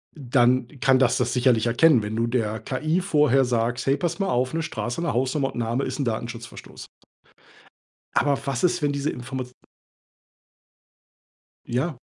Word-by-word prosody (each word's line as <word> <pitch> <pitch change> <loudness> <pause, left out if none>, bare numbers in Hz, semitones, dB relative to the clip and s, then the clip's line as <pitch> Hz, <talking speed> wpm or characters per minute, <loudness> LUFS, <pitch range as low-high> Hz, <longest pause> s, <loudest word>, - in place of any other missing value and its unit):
dann 125 -2 +2
kann 130 -1 +4
dass 130 -2 +3
das - - 0
sicherlich 120 -3 +2
erkennen, 125 +2 +4
wenn 105 +1 -4
du 115 +1 0
der 110 -3 -1
KI 155 +7 -1
vorher 150 -7 +3
sagst: 120 0 -1
„Hey, 135 +1 +2
pass 170 +3 -2
mal 195 - 0
auf, 125 +3 0
'ne 165 - -1
Straße, 140 -4 -4
'ne 170 - -1
Hausnummer 135 +3 0
und - - -13
n' - - -3
Name 120 +4 -1
ist 130 +2 -5
'n 140 - 0
Datenschutzverstoß." 115 +1 -6 1.3
Aber 140 -1 +2
was 135 -3 -2
ist, 180 -1 +2
wenn 145 - +1
diese 140 +1 -2
Informa 130 +1 -5 2.2
ja. 130 +5 -2
130 Hz, 165 wpm, -24 LUFS, 120-145 Hz, 2.2 s, kann